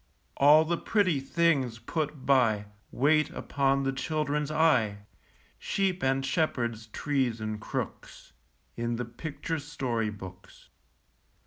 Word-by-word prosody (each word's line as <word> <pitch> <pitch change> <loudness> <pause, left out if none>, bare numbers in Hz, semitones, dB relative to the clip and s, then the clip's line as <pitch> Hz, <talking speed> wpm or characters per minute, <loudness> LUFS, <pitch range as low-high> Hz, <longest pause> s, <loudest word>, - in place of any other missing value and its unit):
All 150 +3 +7
the 170 +1 -1
pretty 185 -9 +2
things 135 -4 +1
put 150 +1 -4
by, 115 -7 +3 0.3
Wait 155 +4 +3
upon 135 0 0
the 135 - +1
children's 150 +1 -1
eye, 120 -11 +2 0.5
Sheep 190 -2 -1
and 135 0 +1
shepherds, 120 -8 -1
trees 130 -1 -1
and 110 -1 -4
crooks, - - -6 0.4
In 120 0 -2
the 120 +1 -3
picture 150 +6 -5
story 130 -6 -2
books. 95 -3 -11
135 Hz, 115 wpm, -28 LUFS, 115-155 Hz, 0.5 s, All